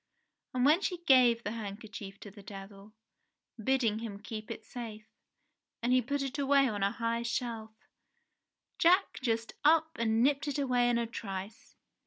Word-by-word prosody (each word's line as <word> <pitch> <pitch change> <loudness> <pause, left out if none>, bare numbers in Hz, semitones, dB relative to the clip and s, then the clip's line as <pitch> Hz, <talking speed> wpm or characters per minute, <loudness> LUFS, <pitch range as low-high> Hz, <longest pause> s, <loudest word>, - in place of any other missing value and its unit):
And 250 0 +2
when 310 +6 +5
she 365 -3 -1
gave 250 -6 +5
the 205 - -3
hand 210 -3 -5
kerchief 200 -3 -9
to 205 - -9
the 205 +1 -13
Devil, 195 +1 -11 0.7
bidding 235 -4 +2
him 220 -3 -6
keep 215 +1 -7
it 220 - -7
safe, 220 -3 -8 0.8
and 245 +1 +2
he 255 - +5
put 280 +4 -2
it 275 +2 -4
away 275 0 +4
on 210 -4 -3
a 195 - +3
high 230 +2 -2
shelf, 235 -2 -3 1.1
Jack 365 +4 +4
just 230 -2 -1
up 320 +1 +4
and 225 0 +2
nipped 280 +2 +2
it 290 - -1
away 250 -3 +2
in 240 - +2
a 235 - 0
trice 200 -2 -7
230 Hz, 170 wpm, -31 LUFS, 215-265 Hz, 1.1 s, when